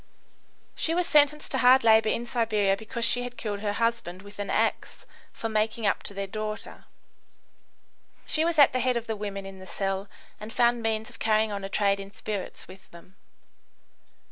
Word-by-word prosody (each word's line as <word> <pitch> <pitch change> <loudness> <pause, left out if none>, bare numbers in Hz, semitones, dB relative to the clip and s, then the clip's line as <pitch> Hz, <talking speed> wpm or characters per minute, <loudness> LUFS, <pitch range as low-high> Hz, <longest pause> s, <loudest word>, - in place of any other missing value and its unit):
She 330 - -1
was 360 0 +1
sentenced 300 0 +4
to - - 0
hard 255 +1 +6
labour 220 -1 +5
in 235 - -1
Siberia 215 -5 +1
because 230 +3 -3
she 245 +1 +2
had 245 0 -7
killed 205 -2 -4
her 205 0 -2
husband 230 -5 -2
with 205 0 -13
an 205 - -4
axe - - -1 0.3
for 225 - -5
making 220 +1 -1
up 200 - +1
to 200 - -7
their 200 0 -3
daughter. 215 +1 -6 1.4
She 315 - +1
was 335 0 0
at 285 -3 +7
the 255 - +1
head 250 0 +1
of 235 - -4
the 225 - -3
women 200 -2 -5
in 195 0 -10
the 185 - -11
cell, 195 +1 -3 0.3
and 215 +1 -8
found 240 0 +2
means 220 0 -1
of 230 - -15
carrying 215 0 +2
on 200 -1 -4
a 195 - -4
trade 200 0 +1
in 195 0 -8
spirits 205 -2 -6
with 190 +1 -15
them. 170 +3 -16
215 Hz, 195 wpm, -27 LUFS, 200-235 Hz, 1.4 s, at